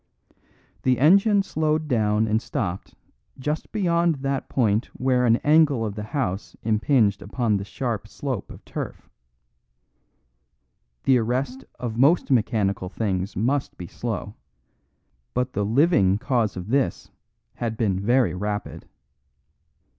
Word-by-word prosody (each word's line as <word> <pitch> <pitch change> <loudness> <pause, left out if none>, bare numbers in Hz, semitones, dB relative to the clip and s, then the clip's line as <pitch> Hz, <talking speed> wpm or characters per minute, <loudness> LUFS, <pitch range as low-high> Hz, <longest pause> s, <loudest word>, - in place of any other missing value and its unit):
The 130 -1 +2
engine 195 - +5
slowed 155 -3 0
down 110 -4 +2
and 110 +1 +1
stopped 95 -6 -4 0.4
just 150 +4 -3
beyond 170 -5 +2
that 135 -1 -2
point 110 -3 +1
where 125 -1 +2
an 115 - +5
angle 145 -6 +4
of 105 - -3
the 105 - -6
house 105 -4 -3
impinged 110 -2 +2
upon 110 0 0
the 100 - -4
sharp 110 +1 -4
slope 130 -2 -4
of - - -13
turf. - - -6 2.0
The 130 -2 +4
arrest 125 +3 -2
of 115 -2 -4
most 145 +3 +4
mechanical 105 -6 +1
things 95 -1 -2
must 130 +7 -1
be 90 - -7
slow; 105 +2 -5 1.0
but 125 +1 -1
the 100 - 0
living 115 - +3
cause 115 -4 0
of 90 +3 -6
this 135 +1 0 0.5
had 115 -2 -3
been 100 -5 0
very 120 +5 +2
rapid. 105 +3 -4
120 Hz, 125 wpm, -24 LUFS, 105-140 Hz, 2.0 s, engine